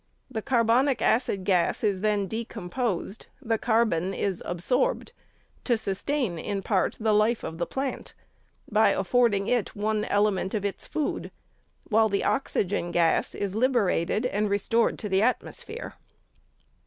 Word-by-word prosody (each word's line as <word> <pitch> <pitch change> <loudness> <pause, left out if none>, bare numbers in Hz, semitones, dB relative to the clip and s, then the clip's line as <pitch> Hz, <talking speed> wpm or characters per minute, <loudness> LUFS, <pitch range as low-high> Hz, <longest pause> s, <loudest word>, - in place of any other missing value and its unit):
The 220 - -3
carbonic 245 +2 +2
acid 220 -5 +1
gas 180 0 +1
is 200 -3 +1
then 210 -2 +1
decomposed, 220 -1 -4
the 225 -5 -1
carbon 215 -6 +1
is 195 -3 -2
absorbed, 250 - 0 0.5
to 240 -3 +2
sustain, 210 - -2
in 195 +3 -3
part, 195 -4 0
the 220 -1 +2
life 215 +3 +2
of 160 - -6
the 170 - -1
plant, 270 0 -4 0.5
by 215 0 +4
affording 205 0 +2
it 245 -4 0
one 215 +1 0
element 205 -1 +1
of 205 -1 -2
its 200 - -4
food, 305 - -2 0.6
while 220 0 +4
the 200 -1 0
oxygen 200 -9 0
gas 170 -1 +1
is 200 -2 -3
liberated, 220 -4 +1
and 210 -3 0
restored 215 +3 +1
to 215 - -5
the 190 -1 +2
atmosphere. 425 - -2
215 Hz, 140 wpm, -26 LUFS, 195-235 Hz, 0.6 s, by